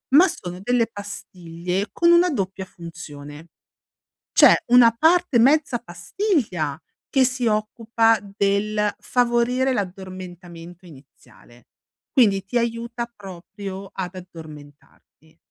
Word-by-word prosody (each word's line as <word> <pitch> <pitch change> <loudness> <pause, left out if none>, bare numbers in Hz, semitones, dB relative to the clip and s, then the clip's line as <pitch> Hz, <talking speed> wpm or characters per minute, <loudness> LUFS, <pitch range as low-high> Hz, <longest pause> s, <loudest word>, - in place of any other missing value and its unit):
ma 350 +6 +8
sono 180 - -7
delle 240 +2 +1
pastiglie 185 -2 -5
con 340 0 +3
una 345 +1 +5
doppia 195 - -3
funzione. 160 -3 -11 0.9
C'è - - +7
una 245 -1 +7
parte 320 +2 +3
mezza 275 +1 +3
pastiglia 180 - -2 0.3
che 265 -1 +3
si 250 -1 -1
occupa 225 +1 +1
del 205 +1 -1
favorire 245 +2 +1
l'addormentamento 180 -4 -7
iniziale, 130 -5 -19 0.4
quindi 200 -7 +3
ti 220 +5 -1
aiuta 235 0 -3
proprio 195 +1 -9
ad 185 -1 -5
addormentarti. 155 -2 -14
200 Hz, 100 wpm, -22 LUFS, 175-240 Hz, 0.9 s, ma